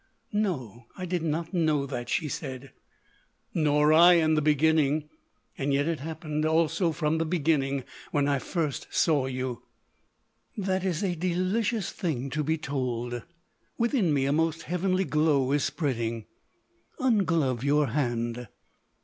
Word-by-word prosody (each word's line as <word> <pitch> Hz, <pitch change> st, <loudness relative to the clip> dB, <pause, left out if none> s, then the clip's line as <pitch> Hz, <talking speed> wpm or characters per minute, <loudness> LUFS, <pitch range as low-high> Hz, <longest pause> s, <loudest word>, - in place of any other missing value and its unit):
"No, 130 Hz, -, -2 dB
I 185 Hz, -, -4 dB
did 180 Hz, -1 st, -1 dB
not 165 Hz, +2 st, -2 dB
know 155 Hz, -5 st, +2 dB
that," 125 Hz, -3 st, -5 dB
she 155 Hz, +4 st, 0 dB
said. 135 Hz, -2 st, -6 dB, 0.8 s
"Nor 150 Hz, -1 st, +3 dB
I, 170 Hz, +3 st, +8 dB
in 160 Hz, -2 st, +3 dB
the 155 Hz, -, +2 dB
beginning. 150 Hz, 0 st, +2 dB, 0.5 s
Yet 140 Hz, +1 st, +1 dB
it 165 Hz, -2 st, -1 dB
happened, 155 Hz, 0 st, -4 dB
also, 165 Hz, +2 st, +2 dB
from 155 Hz, 0 st, 0 dB
the -, -, +2 dB
beginning 145 Hz, -5 st, 0 dB, 0.3 s
when 145 Hz, -1 st, +1 dB
I 140 Hz, -1 st, +1 dB
first 155 Hz, -1 st, -3 dB
saw 145 Hz, -5 st, +2 dB
you." 130 Hz, -3 st, -4 dB, 1.0 s
"That 190 Hz, -2 st, -1 dB
is 185 Hz, -1 st, -1 dB
a 185 Hz, -3 st, 0 dB
delicious 185 Hz, +5 st, 0 dB
thing 140 Hz, -, -3 dB
to 150 Hz, +3 st, -1 dB
be 160 Hz, +2 st, 0 dB
told. 125 Hz, -5 st, -3 dB, 0.6 s
Within 230 Hz, -, +2 dB
me 140 Hz, -2 st, +2 dB
a 140 Hz, -, +1 dB
most 160 Hz, +1 st, 0 dB
heavenly 185 Hz, +2 st, 0 dB
glow 150 Hz, -5 st, +2 dB
is 145 Hz, -1 st, +2 dB
spreading.... 115 Hz, -7 st, -2 dB, 0.7 s
Unglove 165 Hz, -, +1 dB
your 145 Hz, +1 st, +3 dB
hand." 120 Hz, -4 st, -2 dB
155 Hz, 140 wpm, -27 LUFS, 135-170 Hz, 1.0 s, I